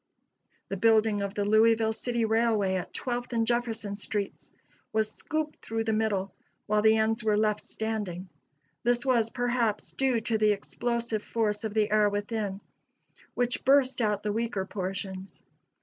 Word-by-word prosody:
The 195 - -3
building 220 0 +3
of 200 0 -3
the 205 - 0
Louisville 220 +1 +4
City 235 0 -1
Railway 220 -3 +2
at 185 -1 -3
Twelfth 245 -1 -3
and 230 -1 +2
Jefferson 225 -4 -1
streets 205 -1 -4 0.4
was 220 -1 0
scooped 310 +3 -4
through 225 0 -2
the 220 0 0
middle, 205 -3 0 0.3
while 210 0 +2
the 220 +1 +5
ends 220 +1 +1
were 215 -1 +2
left 210 -1 +1
standing. 205 -5 -4 0.5
This 240 +1 +1
was, 235 -4 +3
perhaps, 240 -3 -1
due 260 -3 +1
to 220 -1 0
the 215 -1 +4
explosive 235 +2 -2
force 210 -1 -1
of 220 -1 -4
the 215 -1 +2
air 210 -1 +4
within, 205 -1 -3 0.7
which 245 0 0
burst 265 -2 +4
out 210 -2 0
the 210 -1 -1
weaker 225 -4 -1
portions. 190 0 -5
220 Hz, 155 wpm, -28 LUFS, 205-230 Hz, 0.7 s, the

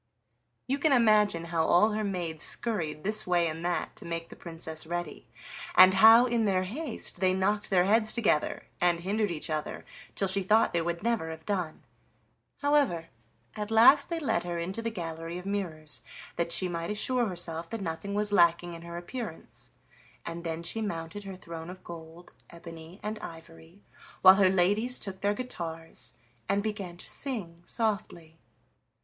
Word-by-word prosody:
'" 120 0 -48
You 275 +2 0
can 310 +1 +2
imagine 210 -8 +4
how 165 -1 +2
all 180 +7 +4
her 215 +1 -1
maids 175 -6 -2
scurried 160 -10 -1
this 215 0 +1
way 175 -1 +3
and 160 +1 -5
that 175 0 -2
to - - -6
make 165 0 -5
the - - -11
Princess 160 -1 -3
ready, 175 +1 -5 0.5
and 185 0 +9
how 225 +5 +8
in 235 -2 +1
their 185 -2 +2
haste 250 - -3
they 185 -1 +2
knocked 205 +2 0
their 180 -2 +3
heads 215 +2 +4
together 205 -10 0 0.2
and 175 -1 +2
hindered 205 +3 0
each 165 -3 -4
other, 155 -1 -4 0.3
till 195 - +1
she 195 +1 +3
thought 215 +4 +3
they 170 - +1
would 170 +2 -3
never 230 -8 0
have 160 0 -9
done. 180 -6 -3 0.8
However, 280 - +2 0.5
at 210 0 -4
last 235 +6 +6
they 335 - -2
led 245 -9 0
her 175 -1 -4
into 185 +6 -3
the 230 - -2
gallery 165 -4 -5
of 180 - -8
mirrors 170 -7 -3 0.3
that 170 0 0
she 185 - +2
might 170 -1 -4
assure 240 +3 +1
herself 170 -3 -1
that 230 - -4
nothing 195 +3 -4
was 210 0 +1
lacking 175 -2 +3
in 165 - -9
her 170 0 -8
appearance, 175 0 -8 0.5
and 170 0 -6
then 165 0 -4
she 220 +6 -1
mounted 175 0 -5
her 195 -1 -7
throne 165 -2 -8
of 185 0 -10
gold, 165 0 -11 0.2
ebony, 165 +2 -11
and 215 +1 -4
ivory, 165 +2 -12 0.4
while 185 0 +11
her 195 -2 +5
ladies 205 +7 +2
took 190 -2 -6
their 205 0 +1
guitars 165 -9 -6 0.4
and 200 0 +1
began 200 -5 -4
to - - -11
sing 195 -12 -5
softly. 195 -8 -3
185 Hz, 175 wpm, -29 LUFS, 165-210 Hz, 0.8 s, while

